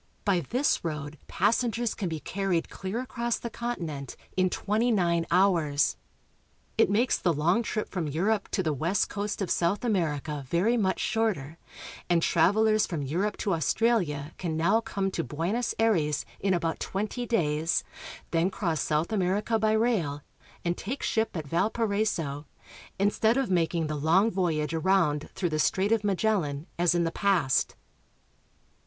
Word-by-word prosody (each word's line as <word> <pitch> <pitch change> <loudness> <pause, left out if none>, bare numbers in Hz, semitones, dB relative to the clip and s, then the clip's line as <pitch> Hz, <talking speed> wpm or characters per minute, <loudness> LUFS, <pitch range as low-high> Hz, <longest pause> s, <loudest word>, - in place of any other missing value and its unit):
By 195 -4 +3
this 250 - 0
road 150 -2 -5
passengers 230 +3 +1
can 190 -5 -3
be 160 -1 -4
carried 185 -1 -2
clear 195 +5 -4
across 240 -2 -2
the 235 - -6
continent 165 - -4 0.2
in 185 0 +3
twenty 215 +6 0
nine 170 -6 +1
hours. 170 -6 +3 0.8
It - - +4
makes 230 +5 +2
the 175 - +2
long 170 +8 +2
trip 215 -1 -3
from 175 -5 -3
Europe 195 +8 0
to 190 - +1
the 155 -3 0
west 165 +8 0
coast 205 0 -3
of 180 - -3
South 195 +7 +1
America 150 - -1
very 190 - +2
much 190 -5 +1
shorter, 195 - -1 0.5
and 170 -2 +3
travel 205 +6 +3
ers 215 0 +3
from 160 -5 -3
Europe 180 +10 -1
to 195 - 0
Australia 165 - 0
can 165 -3 -2
now 195 +8 +3
come 195 -4 -2
to 165 - -2
Buenos 170 - -2
Aires 160 -10 +1
in 190 -1 +1
about 165 -2 -1
twenty 215 +5 -3
days, 160 -7 +1 0.5
then 165 +2 +2
cross 170 -7 -1
South 155 +4 0
America 205 +3 +1
by 215 0 +2
rail, 200 -11 0 0.4
and 170 0 +1
take 260 +7 -4
ship 220 -4 0
at 155 - -4
Valparaiso, 190 -5 -1 0.5
instead 220 +4 +2
of 270 -7 0
making 170 -2 +1
the 155 - -3
long 170 +9 +3
voyage 165 -5 0
around 160 -3 +1
through 180 -3 -1
the 155 -1 -1
Strait 195 +6 +1
of 225 -2 +2
Magellan, 190 -8 0
as 175 -1 +3
in 175 - +2
the 165 - -1
past. 175 -10 +1
185 Hz, 160 wpm, -28 LUFS, 160-215 Hz, 0.8 s, It